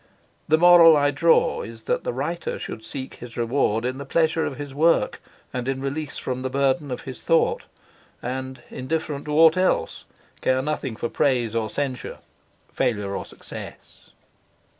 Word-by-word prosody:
The 155 - +4
moral 170 -2 +8
I 145 0 +3
draw 165 +4 +3
is 115 0 -9
that - - -1
the - - -1
writer 150 +8 -3
should 110 - -7
seek 130 +3 -7
his 120 -1 -10
reward 120 -2 +1
in 130 +2 -2
the - - -4
pleasure 160 +2 +1
of 135 - -5
his 145 -2 -7
work 165 +4 +2 0.3
and 125 0 -3
in 135 0 -1
release 140 +2 -4
from 130 0 -3
the 130 - -2
burden 140 +3 +1
of 125 - -4
his 130 - -8
thought; 165 - +2 0.5
and, 130 0 -5
indifferent 150 +1 -3
to 150 - -3
aught 160 +1 +7
else, 185 0 0 0.4
care 130 0 +1
nothing 140 -5 -3
for 120 - -3
praise 120 -4 +1
or 115 -2 -1
censure, 135 -2 -4 0.6
failure 105 -4 -1
or - - -4
success. - - -11
135 Hz, 165 wpm, -24 LUFS, 125-155 Hz, 0.6 s, moral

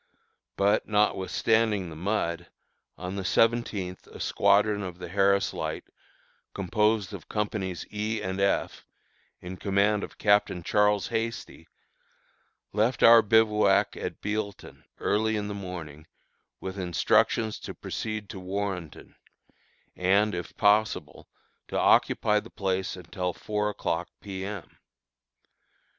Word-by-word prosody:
But, 100 +2 +2
notwithstanding 105 -1 +1
the - - -8
mud, 85 -1 -2 0.5
on 90 +1 -5
the 100 - -3
seventeenth 105 -4 0
a - - -12
squadron 105 0 +3
of 90 -3 -6
the 90 -1 -8
Harris 100 +1 +2
Light, - - -4 0.7
composed 105 +1 +1
of - - -9
Companies 100 -4 -3
E 110 +1 -2
and 95 +1 -3
F, 100 - 0 0.5
in 90 +1 -7
command 100 +2 +1
of - - -8
Captain 100 -4 +2
Charles 105 +1 +2
Hasty, 115 0 -4 1.1
left 110 +5 +1
our 115 0 +9
bivouac 110 0 +3
at - - -6
Bealeton, 105 -1 -4
early 110 +1 +1
in 105 -1 -3
the 105 - -4
morning, 85 -6 -8 0.5
with 95 +1 -6
instructions 95 +4 +1
to - - -8
proceed 110 -2 -5
to 95 - -7
Warrenton, 95 -3 -5 0.8
and, 100 +4 +2
if 85 -1 -6
possible, 105 +1 +1 0.4
to - - -3
occupy 105 0 +3
the - - -12
place 95 -1 -2
until 90 0 -4
four 105 0 -2
o'clock 85 -4 -2
P. 95 -2 -6
M. 100 -5 -8
100 Hz, 120 wpm, -27 LUFS, 95-105 Hz, 1.1 s, our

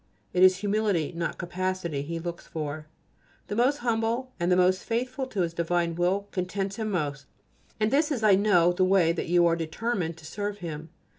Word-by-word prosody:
It 180 - +1
is 185 0 +7
humility, 200 -5 0
not 170 0 -3
capacity, 175 -4 -2
He 165 +4 -4
looks 170 +1 -6
for. 155 -1 -5 0.6
The 205 - -2
most 255 +5 +3
humble 230 +2 0
and 170 +1 +1
the - - +5
most 185 +1 +3
faithful 255 +3 -2
to 210 -7 -2
His 170 -1 -1
divine 170 0 0
will 185 +4 0
contents 195 +2 -3
Him 220 -1 -2
most, 145 -7 -2 0.5
and 215 0 +1
this 300 +2 +2
is, 245 -6 -1
I 210 -2 +6
know, 190 -3 +4
the 185 - +1
way 185 -3 +4
in - - -3
which - - -3
you 175 0 +5
are 170 -1 +3
determined 170 +1 -2
to 160 - -14
serve 205 +4 -4
Him. 160 -4 -7
185 Hz, 200 wpm, -27 LUFS, 170-210 Hz, 0.6 s, is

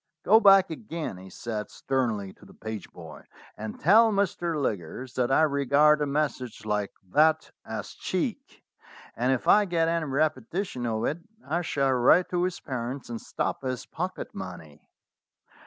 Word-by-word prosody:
"Go 220 +4 +7
back 195 -4 +6
again," 160 - -5
he 95 +1 -11
said 110 +1 -5
sternly 115 -8 -2
to - - -22
the - - -17
page 110 -2 -7
boy, - - -11 0.3
"and 110 0 -7
tell 220 +7 +6
Mr. 175 -5 0
Liggers 120 - -3
that 125 0 0
I 155 - +5
regard 145 +1 +4
a 145 - +1
message 140 -6 -2
like 105 -1 -1 0.2
that 160 +4 +3
as - - -6
cheek, - - -4 0.5
and 125 +3 +1
if 130 - -1
I 210 0 +6
get 170 -3 +1
any 165 -1 0
repetition 140 - -1
of 110 0 -1
it 155 - -1 0.3
I 165 +4 0
shall 140 -5 0
write 130 +8 +4
to 175 -1 0
his 180 0 -1
parents 125 0 -5
and 115 - -5
stop - - -3
his 130 -2 -4
pocket 180 +3 -5
money." 85 -6 -9
140 Hz, 160 wpm, -27 LUFS, 115-165 Hz, 0.5 s, Go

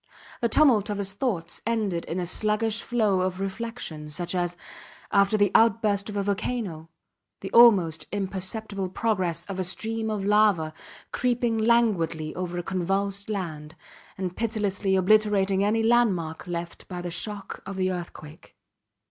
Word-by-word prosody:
The 235 - +2
tumult 230 -6 +4
of 205 - -2
his 195 -1 -3
thoughts 190 -7 -3
ended 215 -7 -1
in 170 - -3
a 180 - -2
sluggish 215 +4 0
flow 215 -6 +1
of 185 0 -2
reflection, 195 -6 -5
such 175 +4 -3
as, 175 -1 -1 0.5
after 200 +1 +4
the 205 -2 +3
outburst 220 -3 +3
of 205 - -4
a 200 - 0
volcano, 200 -5 -3 0.5
the 195 - -6
almost 185 -10 +5
imperceptible 195 0 -3
progress 180 -5 -1
of 195 -2 -6
a - - +1
stream 220 +5 -2
of 210 -2 -2
lava, 205 -7 +3 0.4
creeping 240 -2 0
languidly 195 -9 +2
over 180 -1 -4
a 175 - -2
convulsed 195 +3 -2
land 160 -6 -5 0.4
and 185 -2 -4
pitilessly 205 -4 0
obliterating 195 0 +3
any 220 +2 +2
landmark 195 -10 +1
left 170 -1 -6
by 180 -1 -6
the 175 - -4
shock 200 +3 -4
of 195 - -5
the 185 0 0
earthquake. 170 -3 -8
195 Hz, 150 wpm, -26 LUFS, 175-220 Hz, 0.5 s, almost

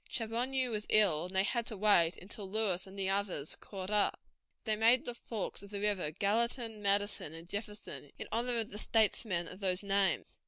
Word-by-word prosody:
Chaboneau 250 +3 0
was 210 -1 -3
ill, 185 -7 +4
and 185 - -10
they 190 - +4
had 235 +2 -1
to 220 - -2
wait 185 -5 +4
until 195 +1 -6
Lewis 195 -3 0
and 190 +1 -12
the 195 -1 -1
others 195 -7 0
caught 190 -1 -7
up. 210 -1 +3 0.4
They 215 -2 0
named 230 +4 +4
the 245 - -2
forks 225 -3 -3
of 200 - -11
the 200 0 -5
river 200 -6 0
Gallatin, 225 - 0
Madison, 200 -5 0
and 165 +1 -9
Jefferson, 200 - -6
in - - -6
honor 235 +2 0
of 220 - -6
the 210 - -6
statesmen 210 -6 +1
of 180 - -10
those 185 -1 +1
names. 200 -1 0
205 Hz, 195 wpm, -33 LUFS, 190-220 Hz, 0.4 s, ill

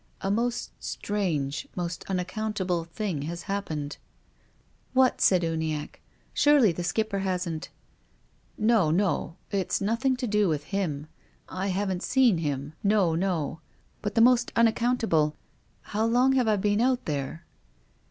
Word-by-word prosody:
"A 195 - -1
most 235 +3 -1
strange, 170 - -2
most 175 -1 -3
unaccountable, 185 -2 -2
thing 170 -2 -3
has 170 0 -6
happened." 155 -8 -3 1.0
"What?" 260 -1 +3
said 180 -2 +4
Uniacke. 160 -2 -3 0.3
"Surely 290 -9 +5
the 175 +1 -4
Skipper 215 +2 -1
hasn't 180 -4 -2 0.3
— - - -38
" - - -37 0.2
"No, 195 -9 +4
no. 170 -1 0 0.2
It's 195 -3 0
nothing 230 +6 +1
to 250 0 -3
do 210 -3 +2
with 150 -2 -1
him. 155 -6 -2 0.4
I 185 +1 -3
haven't 190 -1 -1
seen 245 -9 +3
him. 145 -1 -3
No, 200 -5 +3
no 165 -3 -1 0.2
— - - -38
but 205 - -3
the 225 - +5
most 240 0 +5
unac 230 -1 +5
countable 225 -11 +1 0.2
— - - -38
how 220 +2 +2
long 250 +3 +4
have 255 -3 +2
I 215 - +4
been 205 +2 +1
out 255 0 +1
there?" 150 +2 -4
195 Hz, 150 wpm, -27 LUFS, 165-220 Hz, 1.0 s, Surely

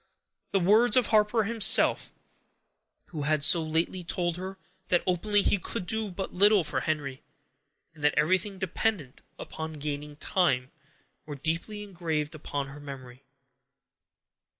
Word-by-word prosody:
The 195 - +1
words 220 +7 +4
of 250 - +4
Harper 215 +1 +2
himself, 220 -1 +5 1.0
who 160 -6 -6
had 150 0 0
so 165 +3 +6
lately 165 +3 -2
told 175 0 -1
her 190 +2 -7 0.3
that 175 - +1
openly 200 +3 +1
he 200 - +1
could 195 +2 -5
do 220 +2 -1
but 190 +1 -6
little 200 +1 +4
for - - -2
Henry, 145 -4 -3 0.7
and 155 -2 -15
that 150 - +2
everything 185 +6 0
depended 185 -5 -3 0.2
upon 160 0 -7
gaining 150 0 -6
time, 140 -6 0 0.6
were 145 - -6
deeply 165 +9 -3
engraved 165 -6 -4
upon 145 -2 -5
her 140 +2 -11
memory. 135 -3 -11
170 Hz, 135 wpm, -27 LUFS, 150-200 Hz, 1.0 s, so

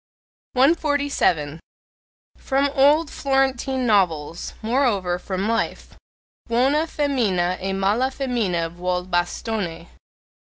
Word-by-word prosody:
147. 275 - +1 0.8
From 275 +1 0
old 295 +3 +4
Florentine 265 -1 0
novels 175 -7 0
moreover, 215 -7 +1
from 190 +2 -3
life: 230 0 -2 0.5
Buona 270 +7 +2
femmina 220 - 0
e 195 +1 -2
mala 200 +7 +1
femmina 230 -11 -1
vuol 180 +1 -2
bastone. 175 -1 -2
225 Hz, 85 wpm, -22 LUFS, 180-270 Hz, 0.8 s, old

